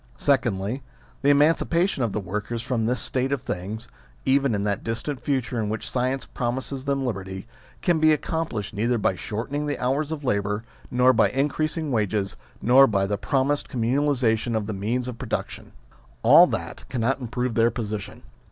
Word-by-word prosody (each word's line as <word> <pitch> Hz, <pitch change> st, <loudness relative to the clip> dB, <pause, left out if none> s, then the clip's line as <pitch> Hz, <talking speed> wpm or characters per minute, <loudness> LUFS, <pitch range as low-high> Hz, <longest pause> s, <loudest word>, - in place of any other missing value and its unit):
Secondly, 120 Hz, -3 st, +1 dB, 0.4 s
the 140 Hz, -, +3 dB
emancipation 165 Hz, +3 st, +3 dB
of 115 Hz, -3 st, +1 dB
the 105 Hz, -, -2 dB
workers 105 Hz, +4 st, -4 dB
from 120 Hz, -3 st, -1 dB
this 125 Hz, +1 st, 0 dB
state 130 Hz, +1 st, -1 dB
of 140 Hz, -4 st, -1 dB
things 105 Hz, +6 st, -5 dB, 0.4 s
(even 135 Hz, -3 st, +3 dB
in 100 Hz, -, -1 dB
that 100 Hz, -1 st, -1 dB
distant 120 Hz, +5 st, -3 dB
future 130 Hz, -4 st, -1 dB
in 105 Hz, -2 st, -1 dB
which 110 Hz, -, -4 dB
science 130 Hz, +1 st, 0 dB
promises 130 Hz, +2 st, -3 dB
them 140 Hz, -1 st, 0 dB
liberty) 95 Hz, -4 st, -4 dB, 0.4 s
can 175 Hz, -3 st, +3 dB
be 155 Hz, 0 st, +5 dB
accomplished 150 Hz, -, -2 dB
neither 115 Hz, +4 st, +1 dB
by 100 Hz, -3 st, +1 dB
shortening 120 Hz, +11 st, -3 dB
the 145 Hz, -, -1 dB
hours 140 Hz, +5 st, 0 dB
of 155 Hz, -2 st, -4 dB
labour, 105 Hz, -2 st, 0 dB, 0.3 s
nor 125 Hz, +1 st, +4 dB
by -, -, +4 dB
increasing 150 Hz, +3 st, -1 dB
wages, 105 Hz, -3 st, 0 dB, 0.3 s
nor 130 Hz, +3 st, +7 dB
by 100 Hz, -4 st, +1 dB
the 100 Hz, +1 st, -1 dB
promised 140 Hz, +2 st, 0 dB
communalisation 120 Hz, -2 st, +1 dB
of 110 Hz, -2 st, 0 dB
the 110 Hz, -, -3 dB
means 115 Hz, +6 st, -1 dB
of 120 Hz, -2 st, -6 dB
production. -, -, -4 dB, 0.5 s
All -, -, +8 dB
that, -, -, -4 dB
cannot 130 Hz, +3 st, 0 dB
improve 125 Hz, 0 st, -2 dB
their 115 Hz, +1 st, +4 dB
position. 105 Hz, -4 st, -5 dB
125 Hz, 170 wpm, -25 LUFS, 110-140 Hz, 0.5 s, All